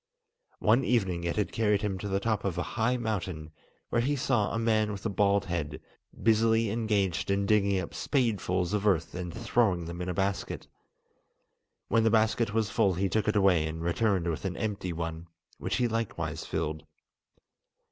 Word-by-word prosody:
One 115 +5 +3
evening 95 -9 0
it 85 - -1
had 105 - -1
carried 105 -2 +1
him 95 -3 -1
to 105 - -4
the 100 0 0
top 110 0 -1
of 95 -3 -2
a 90 - 0
high 120 +3 +1
mountain, 95 -9 -3 0.4
where 120 - +2
he 140 +4 +1
saw 120 -6 +1
a - - -1
man 110 -2 +2
with 100 0 -7
a - - +1
bald 100 0 +2
head, 85 -5 -3 0.4
busily 115 -1 +3
engaged 105 -6 0
in 100 0 +1
digging 100 -2 +3
up 90 - -5
spadefuls 100 - 0
of 105 0 +1
earth 85 -5 +1
and 90 -1 -4
throwing 105 -4 +1
them 85 +1 -6
in 90 - -3
a 90 - -2
basket. 95 +1 -2 1.2
When 115 +1 +3
the 115 - +4
basket 110 0 +2
was 110 -1 0
full 95 -3 +2
he 95 +2 0
took 110 +2 0
it 105 - +1
away 95 -6 +4
and 80 +1 -5
returned 90 0 +1
with 80 -2 -2
an 95 -2 -3
empty 100 -5 -2
one, 80 0 -5 0.3
which - - -2
he 125 -1 +2
likewise 85 -9 -3
filled. 80 -1 -2
100 Hz, 185 wpm, -29 LUFS, 90-110 Hz, 1.2 s, the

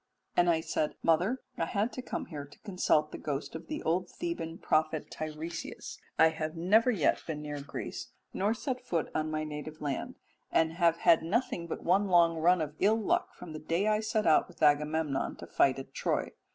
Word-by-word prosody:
"And 175 0 +4
I 165 -1 +3
said, 155 -1 -1
'Mother, 180 +10 +2 0.2
I 165 - +2
had 205 +7 -1
to 255 - -5
come - - -4
here 145 -4 -7
to 145 - -17
consult 180 -7 +1
the - - -7
ghost 145 -1 -3
of 160 - -8
the 305 0 -4
old 175 +2 0
Theban 335 - -4
prophet 155 0 0
Teiresias, 155 +2 -6 0.2
I 160 - +7
have 160 0 -4
never 210 +8 +4
yet 200 - +2
been 150 -2 -4
near 145 -1 -5
Greece, 140 - -6 0.3
nor 205 +4 +1
set 255 +2 -3
foot 170 -10 -1
on 155 0 -1
my 155 0 -1
native 155 +1 -6
land, 140 -3 -3 0.4
and 160 0 +3
have 170 -1 +3
had 170 -1 +5
nothing 175 -1 -1
but - - -5
one 195 +4 +3
long 170 -2 +4
run 175 +2 +4
of 150 -1 -3
ill 220 +2 +4
luck 215 - 0
from 175 -3 -9
the 155 - -6
day 170 +6 0
I 215 0 +3
set 215 0 0
out 160 - +5
with 175 - -8
Agamemnon 150 -1 +2
to - - -9
fight 135 -1 +3
at 135 - -8
Troy. - - -1
165 Hz, 205 wpm, -31 LUFS, 155-190 Hz, 0.4 s, I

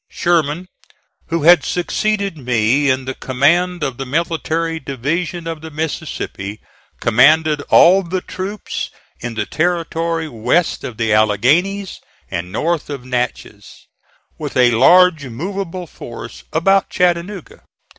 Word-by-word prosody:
Sherman, 170 0 0 0.6
who 165 -2 -1
had 175 +2 +7
succeeded 200 +1 -1
me 125 +1 +1
in 130 0 0
the 130 - -3
command 170 +8 +1
of 130 -4 -2
the 135 - -4
military 165 +2 -1
division 160 +6 -3
of 165 -2 -5
the 160 - -8
Mississippi, 145 - -5 0.4
commanded 150 +6 +4
all 185 +3 +6
the 185 0 -3
troops 195 +4 -5 0.3
in 120 -1 -5
the 105 -1 -1
territory 165 0 -1
west 125 +7 0
of 115 - -6
the 110 -2 +1
Alleghanies 145 - +2 0.3
and 90 +1 -4
north 160 - -1
of 140 -4 -6
Natchez, 125 -4 -4 0.5
with - - -4
a 125 -1 +5
large 165 +4 +5
movable 180 - -5
force 120 -6 -10
about 195 +5 +2
Chattanooga. 180 +1 -1
160 Hz, 125 wpm, -18 LUFS, 125-175 Hz, 0.6 s, had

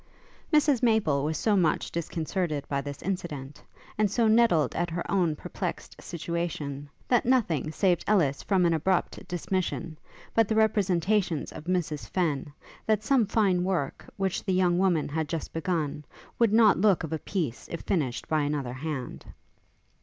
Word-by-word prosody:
Mrs 295 -5 +4
Maple 220 - +2
was 155 +1 -1
so 215 -2 +2
much 170 -5 +1
disconcerted 165 -2 -2
by 140 -1 -1
this 140 0 -7
incident, 150 -7 -4 0.4
and 210 -1 +3
so 225 +3 +2
nettled 215 - +4
at 175 +1 -1
her 170 +1 -3
own 175 -6 +2
perplexed - - -6
situation, 160 -4 -4 0.2
that 245 -2 +3
nothing 185 - +1
saved 180 0 +1
Ellis 160 -10 +2
from 190 -3 +2
an 170 - +3
abrupt 175 +3 -1
dismission, 175 -2 -3 0.3
but 225 -2 +4
the 220 - 0
representations 195 -5 +1
of 155 - -9
Mrs 170 -5 -2
Fenn, 155 -6 -1 0.4
that 215 -1 +2
some 245 -2 +3
fine 195 -4 +2
work, 180 -7 -2
which 190 -2 -1
the 190 - 0
young 180 -1 +3
woman 180 -5 +2
had 155 0 -2
just 165 - -4
begun, 160 -3 -2 0.4
would 230 -3 +4
not 215 -4 +5
look 200 -5 +4
of 160 0 -4
a 160 - -2
piece 155 - -3
if 170 - -4
finished 145 -10 -1
by 155 -1 +1
another 145 -4 -2
hand. 135 -2 -5
175 Hz, 160 wpm, -27 LUFS, 150-200 Hz, 0.4 s, not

